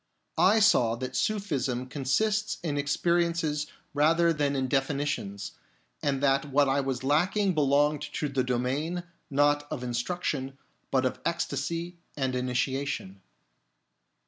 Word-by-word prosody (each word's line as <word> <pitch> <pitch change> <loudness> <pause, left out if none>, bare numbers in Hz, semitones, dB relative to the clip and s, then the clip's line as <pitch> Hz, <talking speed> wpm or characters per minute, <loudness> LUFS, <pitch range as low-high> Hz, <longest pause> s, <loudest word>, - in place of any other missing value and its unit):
1 215 +4 +4
saw 120 - +4
that 130 +2 -5
Sufism 140 - -1
consists 205 +12 0
in 155 -4 -1
experiences 160 +1 0 0.3
rather 165 +3 +4
than 145 -2 0
in 130 -1 0
definitions, 135 -7 -1 0.5
and 140 -1 0
that 135 +1 +3
what 140 0 +3
I 135 +1 +2
was 130 -1 -3
lacking 185 +8 +2
belonged 145 0 +2
to 150 - -1
the 135 -2 0
domain, 135 +8 -1 0.3
not 145 +1 +2
of 125 - -4
instruction, 135 +2 -2 0.3
but 130 -1 +2
of 130 - -1
ecstasy 170 +1 -2 0.2
and 130 -2 0
initiation. 125 -5 -2
145 Hz, 120 wpm, -28 LUFS, 130-165 Hz, 0.5 s, 1